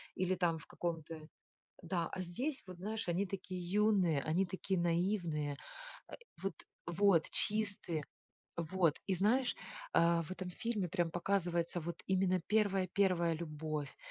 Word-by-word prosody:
или 185 0 +1
там 170 -2 +2
в - - -14
каком-то 165 -2 -4 0.6
Да, 170 0 -1
а 185 - -3
здесь, 255 - -3
вот 180 -1 -9
знаешь, 215 -1 -3
они 185 +4 +1
такие 185 -1 -5
юные, 185 -5 +3
они 170 +5 +2
такие 190 +1 -1
наивные. 170 -4 +1 0.5
Э, - - -8 0.3
вот 195 -3 -1 0.3
Вот, 175 -1 +4
чистые. 200 -7 0 0.5
Вот. 170 -1 +1
И - - +4
знаешь, 240 +8 +2 0.4
а 170 0 +4
в 155 - -11
этом 185 -1 -5
фильме 215 -3 -2
прям 175 -2 0
показывается 175 -1 0
вот 170 +1 -5
именно 185 -1 +3
первая, 195 -3 +2
первая 180 -4 +3
любовь, 155 -2 -4
180 Hz, 140 wpm, -36 LUFS, 170-195 Hz, 0.6 s, Вот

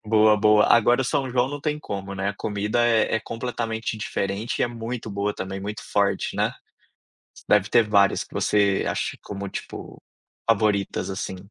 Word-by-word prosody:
Boa, 110 0 +5
boa. 105 0 +5
Agora 120 +2 +4
o - - 0
São 135 +1 0
João 125 +1 +1
não 145 +1 -5
tem 150 0 -1
como, 100 -7 -6
né? 95 +1 -2
A 100 - -3
comida 105 +4 0
é 115 -2 +2
é 110 - +1
completamente 115 -2 -4
diferente 100 +1 -3
e - - +2
é - - +3
muito 115 -1 -6
boa 100 +1 -2
também, 95 +1 -5
muito 105 +2 -6
forte, 100 -1 0
né? - - +1 1.0
Deve 105 -1 +3
ter 115 -2 +4
várias 100 -2 +3
que - - -19
você 100 -2 +2
ache, - - -2
como 100 0 -6
tipo, - - -8 0.5
favoritas, 105 -3 +1
assim. 95 0 -4
105 Hz, 175 wpm, -24 LUFS, 100-115 Hz, 1.0 s, Boa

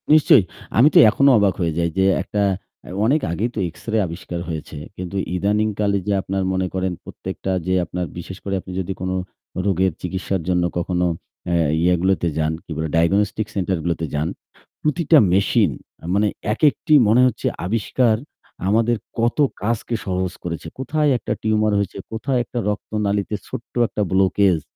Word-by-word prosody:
নিশ্চয়ই। 145 -7 +6 0.3
আমি 125 +6 +7
তো - - +8
এখনো 140 +6 +4
অবাক 100 -3 +3
হয়ে 85 -1 +1
যাই 85 0 +1
যে 95 - +4 0.2
একটা 100 +2 -2 0.5
আ - - -9 0.2
অনেক 145 +6 +3
আগেই 105 +8 -1
তো - - -2
X-ray 110 +3 -2
আবিষ্কার 85 +1 -6
হয়েছে। 80 -2 -6 0.2
কিন্তু 90 +1 -6 0.2
ইদানিংকালে 105 +1 +1
যে 100 - +2
আপনার 95 0 -2
মনে 95 0 0
করেন 95 0 -1
প্রত্যেকটা 95 - -5 0.2
যে 95 - +2
আপনার 90 +1 -3
বিশেষ 95 +2 -7
করে 100 -1 -2
আপনি 95 - -10
যদি 95 +1 -3
কোন 95 0 -2 0.5
রোগের 95 -1 +2
চিকিৎসার 95 0 -2
জন্য 90 -1 +2
কখনো 90 0 0 0.5
আ - - +1 0.3
ইয়ে 90 +1 +4
গুলোতে 95 -2 +2
যান, 80 0 +1
কি - - -12
বলে, 80 0 -2
diagnostic 100 +5 +2
center 95 -1 0
গুলোতে 85 -1 -1
যান, 75 +2 0 0.5
প্রতিটা 155 +1 +3 0.2
machine 95 +1 +3 0.4
মানে 105 +2 +3 0.3
একেকটি 150 +4 +2
মনে 115 +4 +5
হচ্ছে 125 - -2 0.2
আবিষ্কার, 115 +3 +1 0.5
আমাদের 115 +3 +2 0.2
কত 120 +1 +1 0.3
কাজকে 115 +2 -1
সহজ 95 -2 -1
করেছে। 85 -2 -5
কোথায় 150 +3 +1
একটা - - -3
tumor 110 -1 +2
হয়েছে, 100 -1 -3
কোথায় 125 +3 -1
একটা 120 - -5
রক্তনালিতে 105 0 -1
ছোট্ট 120 - -8
একটা 105 - -3
blockage 95 -2 +3
100 Hz, 160 wpm, -21 LUFS, 90-110 Hz, 0.5 s, তো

